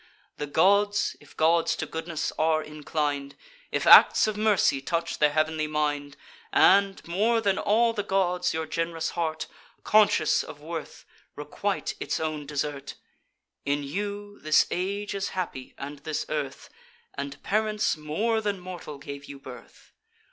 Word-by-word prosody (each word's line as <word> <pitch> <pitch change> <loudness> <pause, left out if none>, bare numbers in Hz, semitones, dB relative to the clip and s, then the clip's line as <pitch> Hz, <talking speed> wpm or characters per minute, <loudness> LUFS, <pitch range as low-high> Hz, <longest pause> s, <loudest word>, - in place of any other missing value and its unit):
The 150 - -4
gods, 200 +6 +3
if - - -19
gods 165 +1 +3
to - - -3
goodness 160 0 -4
are 155 0 +2
inclin'd; 150 -2 -3 0.4
If - - -1
acts - - +8
of 215 -1 -2
mercy 210 -10 +2
touch 170 +3 -2
their 150 - +5
heav'nly 155 0 0
mind, 145 -2 -2 0.3
And, 195 -1 +4
more 215 +7 +2
than 200 -3 +1
all 230 +2 +3
the 210 - -1
gods, 180 -2 0
your 160 0 -2
gen'rous 165 +1 -2
heart. 160 -2 -2 0.4
Conscious 210 -7 +4
of 145 - -10
worth, 160 +1 -7 0.3
requite - - -3
its - - -2
own 155 -2 -3
desert! 140 -1 -4 0.7
In 145 +1 -1
you 205 +6 -5
this 155 0 +4
age 200 +3 -2
is 195 -1 -2
happy, 150 -8 -5
and 140 +1 -7
this 150 +2 -3
earth, 145 -3 -4 0.4
And 140 0 -5
parents 215 0 +1
more 200 +10 -1
than 205 -2 -2
mortal 180 -5 -8
gave 140 0 -8
you 140 - -9
birth. 130 -2 -13
160 Hz, 145 wpm, -26 LUFS, 150-200 Hz, 0.7 s, acts